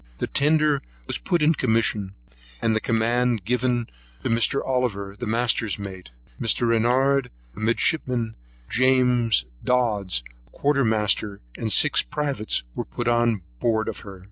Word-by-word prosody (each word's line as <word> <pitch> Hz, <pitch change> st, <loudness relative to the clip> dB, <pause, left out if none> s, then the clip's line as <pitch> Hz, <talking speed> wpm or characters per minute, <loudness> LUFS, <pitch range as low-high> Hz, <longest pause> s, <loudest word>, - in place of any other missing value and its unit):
The -, -, -2 dB
tender 150 Hz, 0 st, +2 dB, 0.2 s
was -, -, -2 dB
put 175 Hz, -4 st, 0 dB
in 155 Hz, +2 st, +5 dB
commission, 110 Hz, -6 st, 0 dB, 0.4 s
and 110 Hz, -, +1 dB
the 110 Hz, -, 0 dB
command 120 Hz, +2 st, +1 dB
of 115 Hz, -, -2 dB
her -, -, -30 dB
given 120 Hz, 0 st, 0 dB, 0.4 s
to -, -, -1 dB
Mr. 115 Hz, +4 st, +2 dB
Oliver 105 Hz, -7 st, -1 dB
the 120 Hz, +3 st, -6 dB
master's 115 Hz, -1 st, +1 dB
mate, 95 Hz, -6 st, -8 dB, 0.3 s
Mr. 115 Hz, +1 st, +1 dB
Renouard 125 Hz, +4 st, +2 dB, 0.3 s
a -, -, -10 dB
midshipman, 115 Hz, 0 st, 0 dB, 0.3 s
James 125 Hz, -, +3 dB, 0.2 s
Dodds 105 Hz, -, +1 dB, 0.2 s
a -, -, -28 dB
quartermaster; 110 Hz, -7 st, 0 dB, 0.2 s
and 110 Hz, -, -3 dB
six 150 Hz, +8 st, +5 dB
privates 140 Hz, -, -1 dB
were -, -, -4 dB
put 90 Hz, -, -5 dB
on 120 Hz, -4 st, +2 dB, 0.2 s
board 110 Hz, -, +1 dB
of -, -, -4 dB
her. 100 Hz, -2 st, -10 dB
115 Hz, 145 wpm, -24 LUFS, 110-130 Hz, 0.4 s, in